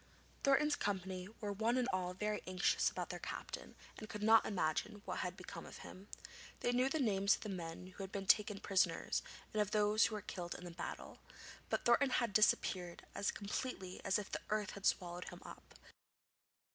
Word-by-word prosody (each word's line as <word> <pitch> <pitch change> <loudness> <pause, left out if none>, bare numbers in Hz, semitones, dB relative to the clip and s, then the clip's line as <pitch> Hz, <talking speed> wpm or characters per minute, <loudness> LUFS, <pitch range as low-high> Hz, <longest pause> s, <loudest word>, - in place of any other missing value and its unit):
Thornton's 290 +2 +4
company 190 -3 -2
were 205 -1 -2
one 225 +4 +1
and 250 -1 +2
all 180 -1 -1
very 210 +2 -1
anxious 185 0 +3
about - - -4
their - - -5
captain - - -6 0.2
and 215 - -8
could 210 -1 -5
not 225 +1 +6
imagine 200 +2 -1
what - - -3
had 180 0 -3
become - - -8
of - - -10
him. 190 +2 -11 0.5
They 245 - +2
knew 250 +2 +3
the 315 - 0
names 200 -5 +4
of - - -12
the 215 - -5
men 175 -2 -5
who 185 +2 -10
had 190 0 -5
been 195 -1 -3
taken 210 0 +4
prisoners 195 -1 +2 0.3
and 215 - +2
of 205 - +1
those 210 +1 +4
who 220 - -4
were 210 - -3
killed 175 -1 -5
in 175 -1 -8
battle, 170 - -6 0.5
but - - -1
Thornton 250 +3 +5
had 235 -4 +1
disappeared 185 -4 +2
as 200 - 0
completely 200 -2 -4
as 195 - +3
if 210 -1 -5
the - - -2
earth 210 -2 0
had 200 - -1
swallowed 175 -1 0
him - - -11
up. - - -11
205 Hz, 195 wpm, -37 LUFS, 185-215 Hz, 0.5 s, not